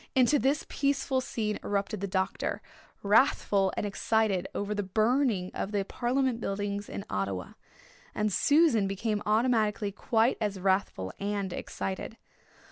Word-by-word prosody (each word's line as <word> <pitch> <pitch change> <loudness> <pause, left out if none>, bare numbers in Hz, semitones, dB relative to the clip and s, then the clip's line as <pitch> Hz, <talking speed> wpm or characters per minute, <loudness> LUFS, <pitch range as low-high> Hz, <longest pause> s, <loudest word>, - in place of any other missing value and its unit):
Into 260 +3 +4
this 275 +6 +1
peaceful 275 -2 0
scene 215 -4 -2
erupted 205 +1 -1
the 200 - -1
doctor, 190 0 -2 0.4
wrathful 200 -3 +3
and - - -1
excited 205 -2 +1
over 205 +1 -2
the 205 - -1
burning 215 0 +1
of 200 - -3
the 200 -2 0
Parliament 250 +2 0
Buildings 205 0 -3
in 200 - -6
Ottawa. 95 -2 -3 0.7
And 210 -2 0
Susan 285 - +4
became 205 +2 -1
automatically 215 -2 +2
quite 225 +3 +1
as 205 -3 -1
wrathful 190 - 0
and 200 -2 -2
excited. 195 +4 -5
210 Hz, 130 wpm, -29 LUFS, 195-235 Hz, 0.7 s, Into